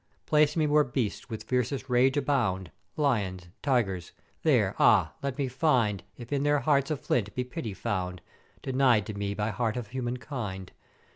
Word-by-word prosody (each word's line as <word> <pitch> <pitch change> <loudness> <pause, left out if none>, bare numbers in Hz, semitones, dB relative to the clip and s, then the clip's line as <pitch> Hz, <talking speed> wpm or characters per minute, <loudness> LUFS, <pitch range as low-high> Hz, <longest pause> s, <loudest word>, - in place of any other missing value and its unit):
"'Place 150 -1 +3
me 155 - +3
where 150 0 +4
beasts 120 -5 -3
with 110 -2 -5
fiercest 125 +3 -1
rage 130 +2 +3
abound, 110 - 0 0.3
Lyons 105 -11 0
and 85 - -20
Tygers, 100 - 0 0.3
there, - - +3
ah! - - +5
let 140 -1 -3
me 140 -2 0
find 125 - +1
if 120 +3 -7
in 140 - +1
their 145 0 +2
hearts 140 +1 +2
of 155 -3 -1
flint 105 -4 -1
be 125 - 0
pity 125 - -6
found, 90 -2 -3 0.4
denied 130 -5 +3
to 105 - -5
me 100 0 -3
by 105 +2 -1
heart 115 +2 -1
of 115 -4 -5
humankind. 120 -6 -4
125 Hz, 170 wpm, -28 LUFS, 105-140 Hz, 0.4 s, ah